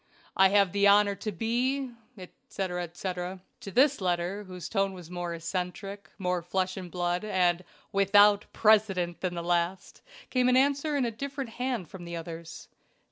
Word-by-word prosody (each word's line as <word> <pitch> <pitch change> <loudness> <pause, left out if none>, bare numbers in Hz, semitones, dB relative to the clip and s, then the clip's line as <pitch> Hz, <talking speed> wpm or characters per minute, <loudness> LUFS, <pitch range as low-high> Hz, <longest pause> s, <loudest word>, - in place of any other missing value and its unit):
"I 190 0 +6
have 200 -2 +4
the 200 0 +3
honor 205 0 +5
to 215 +2 -5
be, 245 +7 -1 0.3
etc., 180 0 -5
etc." 180 +2 -5 0.2
To - - -8
this 265 +3 +3
letter, 180 +3 -1
whose 180 -2 -7
tone 195 -2 0
was 175 -2 -11
more 175 -1 -4
eccentric, 185 +4 -5
more 180 -2 -1
flesh 185 +2 -1
and 185 -2 -7
blood, 175 +1 -1
and 180 -4 +1 0.3
WITHOUT 205 +1 +5
PRECEDENT, 200 -6 +2
than 180 -2 -2
the 170 - -4
last, 175 +2 -1 0.3
came 255 -1 +3
an 255 - +4
answer 285 +2 +2
in 265 - +1
a 235 - -1
different 275 +1 -5
hand 245 -7 -3
from 175 +2 -10
the 170 0 -6
others. 165 0 -8
190 Hz, 165 wpm, -28 LUFS, 175-215 Hz, 0.3 s, I